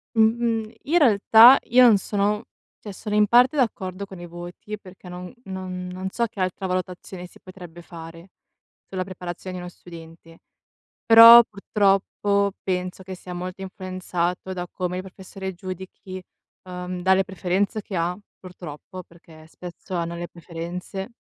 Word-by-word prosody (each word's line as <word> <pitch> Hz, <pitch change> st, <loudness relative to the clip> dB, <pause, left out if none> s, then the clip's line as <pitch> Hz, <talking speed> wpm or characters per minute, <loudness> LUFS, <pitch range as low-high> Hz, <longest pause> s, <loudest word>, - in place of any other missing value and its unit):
Mhmm, 225 Hz, +2 st, +3 dB
mhmm, 225 Hz, -2 st, -1 dB
in 325 Hz, +5 st, +1 dB
realtà 235 Hz, -, +7 dB
io 250 Hz, +2 st, +5 dB
non 215 Hz, -, +6 dB
sono 205 Hz, +2 st, -1 dB, 0.4 s
cioè 205 Hz, -, -9 dB
sono 210 Hz, +2 st, -5 dB
in 210 Hz, 0 st, +4 dB
parte 250 Hz, +6 st, +5 dB
d'accordo 200 Hz, -7 st, -1 dB
con 190 Hz, -2 st, -11 dB
i 175 Hz, -, -8 dB
voti, 175 Hz, +5 st, -8 dB
perché 185 Hz, -2 st, -15 dB
non 180 Hz, 0 st, -8 dB
non 185 Hz, -1 st, -6 dB
non 185 Hz, +1 st, -5 dB
so 235 Hz, +4 st, -1 dB
che 215 Hz, -3 st, -10 dB
altra 185 Hz, +1 st, -2 dB
valutazione 180 Hz, 0 st, -5 dB
si -, -, -19 dB
potrebbe 175 Hz, -2 st, -12 dB
fare 165 Hz, +1 st, -11 dB, 0.6 s
sulla 185 Hz, -1 st, -3 dB
preparazione 185 Hz, 0 st, -7 dB
di 180 Hz, -, -6 dB
uno 180 Hz, -, -7 dB
studente. 165 Hz, -1 st, -14 dB, 0.7 s
Però 230 Hz, +1 st, +11 dB
purtroppo 200 Hz, -1 st, 0 dB
penso 185 Hz, 0 st, -3 dB
che 185 Hz, 0 st, -7 dB
sia 180 Hz, 0 st, -9 dB
molto 180 Hz, +2 st, -6 dB
influenzato 185 Hz, -1 st, -4 dB
da 180 Hz, -1 st, -5 dB
come 180 Hz, 0 st, -3 dB
il 185 Hz, -, -4 dB
professore 190 Hz, 0 st, -8 dB
giudichi 185 Hz, +1 st, -8 dB, 0.4 s
uhm, 180 Hz, 0 st, -6 dB
dalle 190 Hz, +1 st, +3 dB
preferenze 195 Hz, +3 st, -1 dB
che 195 Hz, -, -7 dB
ha, 175 Hz, +2 st, -1 dB, 0.2 s
purtroppo, 180 Hz, 0 st, -10 dB
perché 165 Hz, -2 st, -18 dB
spesso 180 Hz, +3 st, -10 dB
hanno 170 Hz, 0 st, -2 dB
le 175 Hz, 0 st, -5 dB
preferenze. 175 Hz, +5 st, -7 dB
185 Hz, 150 wpm, -23 LUFS, 180-200 Hz, 0.7 s, Però